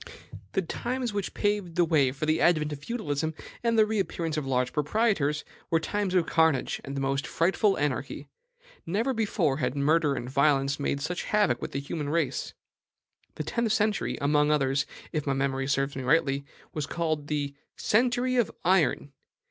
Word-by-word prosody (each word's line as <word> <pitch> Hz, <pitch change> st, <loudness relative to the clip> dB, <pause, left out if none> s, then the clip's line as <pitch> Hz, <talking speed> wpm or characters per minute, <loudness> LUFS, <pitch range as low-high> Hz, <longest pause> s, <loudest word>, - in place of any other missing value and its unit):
The 190 Hz, -, +1 dB
times 245 Hz, +6 st, -3 dB
which 200 Hz, -2 st, -3 dB
paved 205 Hz, -5 st, -1 dB
the 175 Hz, -1 st, +4 dB
way 145 Hz, -5 st, +3 dB
for 140 Hz, +3 st, -3 dB
the 155 Hz, +1 st, +1 dB
advent 155 Hz, -3 st, +3 dB
of 145 Hz, -, -7 dB
feudalism 160 Hz, -, -2 dB, 0.3 s
and 230 Hz, -1 st, +2 dB
the 215 Hz, -, +6 dB
reappearance 190 Hz, -7 st, -2 dB
of 150 Hz, -3 st, -2 dB
large 125 Hz, -1 st, 0 dB
proprietors 150 Hz, -2 st, +1 dB, 0.2 s
were 165 Hz, -, +3 dB
times 195 Hz, +3 st, -2 dB
of 175 Hz, -2 st, +4 dB
carnage 160 Hz, -5 st, +2 dB
and 140 Hz, 0 st, -6 dB
the -, -, -1 dB
most 135 Hz, 0 st, -1 dB
frightful 190 Hz, +4 st, +2 dB
anarchy. 145 Hz, 0 st, -2 dB, 0.6 s
Never 225 Hz, +10 st, 0 dB
before 200 Hz, -, +1 dB
had 125 Hz, -2 st, -1 dB
murder 145 Hz, 0 st, +2 dB
and 120 Hz, -1 st, -4 dB
violence 140 Hz, +1 st, +2 dB
made 140 Hz, 0 st, -1 dB
such 175 Hz, +5 st, -3 dB
havoc 205 Hz, -13 st, +2 dB
with -, -, -4 dB
the 135 Hz, -, -2 dB
human 145 Hz, +1 st, -4 dB
race. 165 Hz, +2 st, -1 dB, 0.8 s
The -, -, -3 dB
tenth 235 Hz, -2 st, 0 dB
century, 215 Hz, -1 st, 0 dB
among 150 Hz, +1 st, +3 dB
others, 140 Hz, -1 st, +1 dB, 0.2 s
if 150 Hz, -2 st, -2 dB
my 140 Hz, -, +2 dB
memory 135 Hz, 0 st, -1 dB
serves 135 Hz, 0 st, 0 dB
me 135 Hz, -, -3 dB
rightly, 140 Hz, 0 st, +2 dB, 0.3 s
was 150 Hz, -3 st, -3 dB
called 155 Hz, -3 st, -2 dB
the 145 Hz, -2 st, -2 dB, 0.2 s
CENTURY 245 Hz, +3 st, +2 dB
OF 235 Hz, -7 st, +3 dB, 0.2 s
IRON. 170 Hz, -6 st, +2 dB
155 Hz, 170 wpm, -28 LUFS, 140-195 Hz, 0.8 s, the